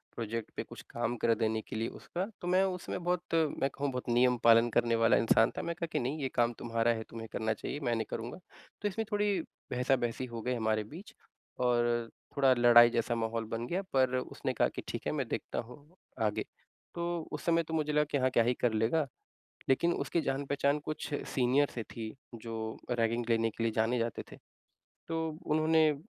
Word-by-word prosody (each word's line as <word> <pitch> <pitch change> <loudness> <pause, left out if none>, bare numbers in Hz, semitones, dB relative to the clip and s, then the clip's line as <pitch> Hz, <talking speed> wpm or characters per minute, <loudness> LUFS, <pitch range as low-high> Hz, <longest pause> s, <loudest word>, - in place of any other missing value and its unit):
Project 115 -1 -4
पे - - -2
कुछ - - -11
काम 120 +1 -2
कर 115 +1 +3
देने 110 0 0
के - - -8
लिए 110 +1 -1
उसका 180 +2 -4 0.2
तो 175 - -4
मैं 185 +2 +4
उसमें 180 -2 -3
बहुत, 175 0 0
मैं 155 -4 +2
कहूँ 140 +1 -2
बहुत 125 -1 -4
नियम 125 +1 +4
पालन 115 0 +7
करने 115 0 +2
वाला 115 0 +4
इंसान 115 0 +4
था। - - -1
मैंने 170 - -2
कहा 170 - -1
कि, 150 - 0
"नहीं 135 +5 -2
ये 135 - -1
काम 120 0 +3
तुम्हारा 115 0 +1
है, 110 -1 -4
तुम्हें 115 -1 -7
करना 110 0 0
चाहिए, 140 +6 -5
मैं 120 -5 0
नहीं 115 - -1
करूँगा।" 115 +8 -5 0.4
तो 205 - +1
इसमें 220 +3 -2
थोड़ी 205 -2 +2 0.3
बहसा-बहसी 125 -1 0
हो 120 -2 -6
गई 125 +3 -1
हमारे 110 -2 0
बीच 185 +6 -10 0.5
और 120 -2 +2 0.3
थोड़ा 135 -2 +6
लड़ाई 120 -1 +8
जैसा 120 0 0
माहौल 115 0 -1
बन 115 +1 -3
गया। 180 +7 -1
पर 130 -1 +3
उसने 125 - -3
कहा - - +3
कि - - -3
ठीक - - -5
है, - - +1
मैं - - -1
देखता - - -3
हूँ 145 +7 -15 0.3
आगे। 105 - -2 0.5
तो 170 0 -1
उस 150 - -5
समय 170 0 +3
तो 160 0 -7
मुझे 150 -1 0
लगा 150 0 +4
कि - - +2
हाँ, 130 -1 +2
क्या 120 -2 +3
ही 120 +2 +2
कर 120 -2 0
लेगा। 120 +8 +2 0.6
लेकिन 170 +6 +3
उसकी 170 - 0
जान 135 +1 -1
पहचान 140 +1 +1
कुछ 155 0 -4 0.2
सीनियर 135 +3 +3
से 120 - -3
थी 110 -1 -7 0.3
जो 115 - -6 0.4
रैगिंग 115 0 +1
लेने 115 -1 +3
के 115 - -6
लिए 115 - +1
जाने 115 +3 +1
जाते 115 -1 -2
थे। - - -10 0.7
तो 165 - -2 0.3
उन्होंने 155 +1 +4
अ, - - -1
125 Hz, 210 wpm, -32 LUFS, 115-150 Hz, 0.7 s, लड़ाई